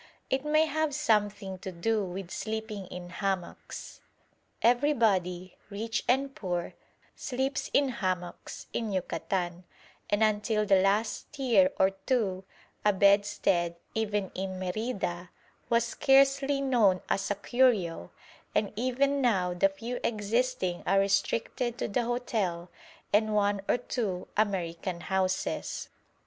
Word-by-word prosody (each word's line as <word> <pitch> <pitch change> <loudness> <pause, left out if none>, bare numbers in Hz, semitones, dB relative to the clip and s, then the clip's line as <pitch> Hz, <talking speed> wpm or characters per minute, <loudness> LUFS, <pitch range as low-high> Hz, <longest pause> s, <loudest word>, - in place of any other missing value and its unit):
It 265 +1 +1
may 305 +1 +3
have 315 -2 -1
something 205 -8 0
to 190 - -6
do 210 +5 0
with 185 0 -6
sleeping 215 -2 -4
in 180 0 -8
hammocks. 190 -2 -4 0.6
Everybody, 220 -9 +2
rich 220 +2 -3
and 270 +2 +2
poor, 175 -6 -3 0.4
sleeps 265 +1 -2
in 280 -1 +3
hammocks 185 -7 -4
in 225 -3 -2
Yucatan, 180 -1 -2 0.5
and 205 +1 +2
until 215 0 +1
the 195 -2 +5
last 215 +8 0
year 275 +1 +4
or 190 0 +4
two 195 -2 -1 0.4
a 210 - +5
bedstead, 200 -3 +3 0.2
even 210 -3 -1
in 190 0 -4
Merida, 185 -2 -3 0.4
was 235 0 +3
scarcely 275 +2 +3
known 225 -9 +3
as 195 - 0
a 205 - +1
curio, 205 - +1 0.5
and 210 -1 +1
even 265 +4 +1
now 190 -8 +2
the 195 +2 +3
few 235 +5 -5
existing 220 -3 0
are 195 - +4
restricted 225 +4 0
to - - -2
the 235 +3 0
hotel 210 -8 -2 0.4
and 215 +1 +3
one 205 -1 +2
or - - +4
two 220 -7 -3
American 180 -4 -1
houses. 190 0 -1
205 Hz, 125 wpm, -29 LUFS, 185-245 Hz, 0.6 s, the